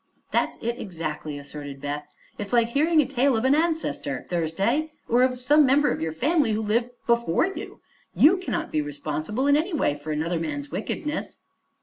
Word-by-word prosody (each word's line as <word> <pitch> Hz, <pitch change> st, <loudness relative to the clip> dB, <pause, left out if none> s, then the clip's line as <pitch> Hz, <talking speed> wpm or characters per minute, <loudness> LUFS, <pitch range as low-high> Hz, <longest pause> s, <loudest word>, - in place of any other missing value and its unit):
"That's -, -, +1 dB
it, 235 Hz, +1 st, -2 dB
exactly," 155 Hz, -5 st, -5 dB
asserted 145 Hz, -1 st, -8 dB
Beth. 145 Hz, +1 st, -4 dB, 0.3 s
"It's 205 Hz, +3 st, -4 dB
like 235 Hz, -1 st, +4 dB
hearing 310 Hz, +5 st, +3 dB
a -, -, -5 dB
tale 265 Hz, -1 st, +2 dB
of 225 Hz, -, -1 dB
an 265 Hz, -, +5 dB
ancestor, 310 Hz, -, -1 dB
Thursday, 195 Hz, -, 0 dB
or 240 Hz, +2 st, +3 dB
of 255 Hz, -1 st, +2 dB
some 295 Hz, +4 st, +5 dB
member 285 Hz, +2 st, +4 dB
of -, -, -3 dB
your 160 Hz, 0 st, -1 dB
family 280 Hz, -, +1 dB
who 215 Hz, -, 0 dB
lived 230 Hz, +3 st, +1 dB, 0.2 s
before 235 Hz, -, +2 dB
you. 385 Hz, -, -7 dB, 0.3 s
You 335 Hz, +6 st, +6 dB
cannot 345 Hz, -3 st, -3 dB
be 155 Hz, -, +1 dB
responsible, 155 Hz, -, -3 dB
in 285 Hz, 0 st, +5 dB
any 330 Hz, +5 st, 0 dB
way, 210 Hz, -, +2 dB
for 145 Hz, +2 st, -6 dB
another 160 Hz, +3 st, -1 dB
man's 145 Hz, -3 st, -4 dB
wickedness." 300 Hz, +7 st, -4 dB
230 Hz, 185 wpm, -25 LUFS, -, 0.3 s, You